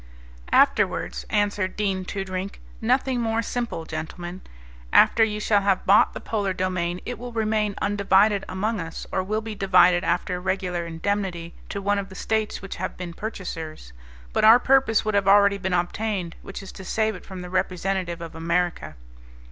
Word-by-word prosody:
"Afterwards," - - +2
answered 205 -2 0
Dean 195 -3 -1
Toodrink, 190 0 -4 0.2
"nothing 250 +2 +1
more 225 0 0
simple, 235 -8 -3
gentlemen. 175 +3 -6 0.5
After 225 - +6
you 210 -1 0
shall 210 -1 +2
have 195 -1 +1
bought 200 +2 +5
the - - -4
polar 200 -4 -2
domain 180 -1 -2
it 245 -1 -5
will 245 0 -7
remain 215 -2 0
undivided 200 0 +3
among 205 +4 -1
us 165 -1 -6
or 190 - 0
will 215 +4 -2
be 220 0 -6
divided 180 -3 +4
after 180 -3 0
a - - -6
regular 180 -2 -2
indemnity 170 0 -3 0.2
to 200 - -4
one 205 +1 +2
of 195 0 -5
the 190 - -11
States 220 0 -2
which 195 - -6
have 185 +1 -4
been 175 -2 -6
purchasers. 165 - -6 0.4
But - - +1
our 225 +2 +9
purpose 260 -4 +3
would 215 - 0
have 200 -1 +2
already 200 0 +5
been 190 0 -2
obtained, 180 0 -1
which 195 - -8
is 195 - -9
to 190 - -10
save 220 +3 0
it 185 - -10
from 185 -2 -8
the 180 - -8
representative 185 -1 -1
of 170 - -7
America." 170 +2 -1
195 Hz, 175 wpm, -24 LUFS, 180-210 Hz, 0.5 s, our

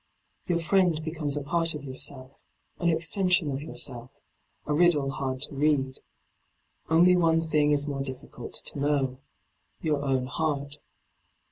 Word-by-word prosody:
Your 175 - +1
friend 170 -1 +2
becomes 155 -3 -1
a 145 - -3
part 165 +2 +2
of 150 - -7
yourself, 130 0 -4 0.4
an 170 - +1
extension 170 0 +2
of 135 +1 -4
yourself, 125 -5 -4 0.6
a 150 - -1
riddle 150 -4 +4
hard 130 -2 -2
to - - +1
read. 140 -2 +1 0.9
Only 175 +3 +5
one 165 -2 +3
thing 150 -2 +2
is 145 0 +3
more 140 -2 -3
difficult 130 -2 -6
to - - -5
know 140 -3 0 0.3
— - - -46
your 150 -3 0
own 135 -2 0
heart. 145 0 -2
150 Hz, 145 wpm, -27 LUFS, 135-165 Hz, 0.9 s, Only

